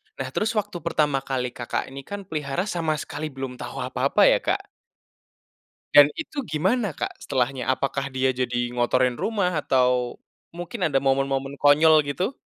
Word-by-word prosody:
Nah, - - -5
terus 220 +1 -1
waktu 205 -4 -2
pertama 150 -4 +1
kali 130 -2 -3
Kakak 120 +2 -4
ini, 135 - -7
kan 205 0 -6
pelihara 155 -2 -3
sama 170 -6 -1
sekali 150 +1 -5
belum 135 -3 -7
tahu - - -5
apa-apa - - +1
ya, - - +3
Kak? - - -1 1.3
Dan 145 0 +9
itu 305 -2 -4
gimana, 195 +8 0
Kak, - - -3
setelahnya 130 -1 -1
apakah 140 +1 -1
dia 130 0 +1
jadi 120 -1 -1
ngotorin 125 +1 +2
rumah 190 - -1
atau 125 -2 +1 0.3
mungkin 175 +4 -3
ada 135 -3 +2
momen-momen 135 0 0
konyol, 155 +2 +6
gitu? 185 - -2
140 Hz, 155 wpm, -24 LUFS, 130-175 Hz, 1.3 s, Dan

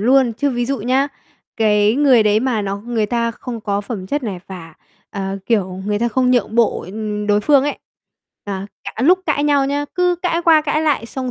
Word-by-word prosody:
luôn. 250 +1 +3
Chứ 285 +5 -1
ví 245 -1 -1
dụ 275 +1 -1
nhá, 260 +6 +1 0.5
cái 210 -1 +3
người 265 -4 +5
đấy 215 0 +3
mà 240 -5 0
nó 200 0 -3
người 220 0 -2
ta 235 +1 0
không 230 0 -7
có 200 -1 -1
phẩm 200 -3 -6
chất 290 +7 -2
này 195 -7 -4
và, 165 -4 -10 0.4
ờ, 195 0 -4
kiểu, 190 -5 0
người 205 0 0
ta 235 - +1
không 250 +2 +1
nhượng 240 -3 +1
bộ, 235 -2 +2
ừm, 210 +2 -4
đối 205 0 +3
phương 280 +2 +4
ấy, 290 - -2 0.7
à, 195 -1 -5 0.2
cả 230 - -5
lúc 360 +6 +5
cãi 290 -1 +1
nhau 285 -2 +3
nhá, 285 +1 -1
cứ 360 -1 +2
cãi 345 -1 0
qua 320 -2 +6
cãi 305 +1 0
lại 285 -7 0
xong 255 +1 -4
235 Hz, 220 wpm, -18 LUFS, 205-275 Hz, 0.7 s, qua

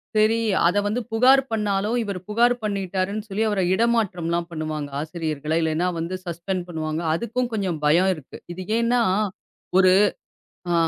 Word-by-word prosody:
செரி, 215 +2 +3 0.3
அத 180 +4 +1
வந்து 220 +4 -1
புகார் 255 +4 +5
பண்ணாலும் 210 +1 0
இவரு 200 -3 -4
புகார் 240 +3 +3
பண்ணிட்டாருன்னு, 200 +1 -2
சொல்லி 205 +3 -1
அவரை 200 -3 0
இடமாற்றம்லாம் 180 -7 0
பண்ணுவாங்க. 155 -2 -4
ஆசிரியர்களை, 155 -1 -3
இல்லைன்னா 160 +3 0
வந்து 170 +3 -3
சஸ்பெண்ட் 175 +1 -3
பண்ணுவாங்க. 160 -1 -3
அதுக்கும் 235 +7 -2
கொஞ்சம் 190 -7 -1
பயம் 175 +6 +4
இருக்கு. 155 -5 -12
இது 185 +2 -6 0.2
ஏன்னா, 235 +1 +2 0.8
ஒரு 185 -1 +6 0.8
ஆ. - - +2
190 Hz, 140 wpm, -23 LUFS, 170-220 Hz, 0.8 s, ஒரு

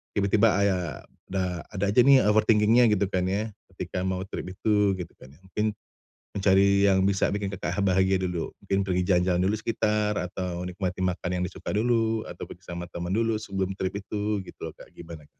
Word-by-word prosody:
tiba-tiba 105 +1 +3
aya 95 -5 0 0.2
da 90 -2 -3
ada 100 0 0
aja 105 - +3
nih, 135 -1 +7
eee, 105 - +2
overthinking-nya 110 +2 +4
gitu 100 -1 +2
kan 90 -1 0
ya, 105 +4 -1 0.3
ketika 90 +1 -4
mau 95 0 -1
trip 95 - -6
itu, 105 -1 +2
gitu 90 -2 -7
kan 65 +1 -14
ya, - - -24
mungkin 105 +3 -2 0.6
mencari 100 0 +4
yang 95 -1 +4
bisa 100 -1 +1
bikin 100 -1 -2
Kakak 90 0 -3
ha - - +2
bahagia 95 0 +3
dulu, 90 -3 -2
mungkin 100 0 0
pergi 90 -1 0
jalan-jalan 90 -1 +3
dulu 105 - +1
sekitar, 105 -2 0
atau 90 0 -4
nikmati 90 0 -4
makan 90 -1 -1
yang - - 0
disuka 95 - -7
dulu, 115 0 +1
atau - - -8
pergi - - -12
sama 85 0 -5
temen 85 0 -4
dulu 115 -1 +1
sebelum 95 -3 -2
trip 95 +1 -2
itu, 105 0 -2
gitu - - -13
loh - - -12
Kak, - - -15
gimana? 80 -3 -11
95 Hz, 195 wpm, -26 LUFS, 90-105 Hz, 0.6 s, nih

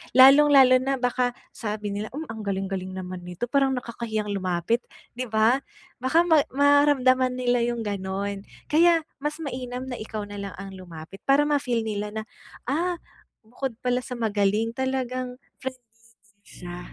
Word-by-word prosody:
lalong 270 +3 +9
lalo 265 -3 +7
na 270 +1 0
baka 245 -1 0 0.2
sabi 210 -2 -4
nila, 205 +2 -3
"Hmm, 310 - -3
ang 220 - -7
galing-galing 190 -2 -3
naman 180 -1 -6
nito, 180 +5 -7
parang 270 -1 +3
nakakahiyang 225 -4 -3
lumapit," 185 +3 0 0.3
di 250 +1 -5
ba? 220 +4 +3 0.4
Baka 285 +7 +3
ma 325 -3 +5 0.2
maramdaman 270 -3 +4
nila 245 -1 +1
yung 235 -1 -2
gano'n, 200 0 -3 0.2
kaya 330 +1 +5 0.2
mas 295 +2 -2
mainam 250 -2 -4
na 245 - -5
ikaw 215 -1 -5
na 205 0 -8
lang 200 -1 -6
ang 195 0 -8
lumapit 180 -1 -10
para 275 +2 +5
ma 295 -1 +2
feel 240 -4 -1
nila 210 -1 -4
na, 220 - -2 0.4
"Ah, 340 +7 0 0.5
bukod 245 +2 -5
pala 250 0 +2
sa 250 0 -6
magaling, 215 -1 +1
talagang 255 0 -2 0.2
friendly 255 -1 -6 0.2
din 210 -3 -30
siya." 175 0 -9
240 Hz, 160 wpm, -25 LUFS, 205-260 Hz, 0.5 s, lalong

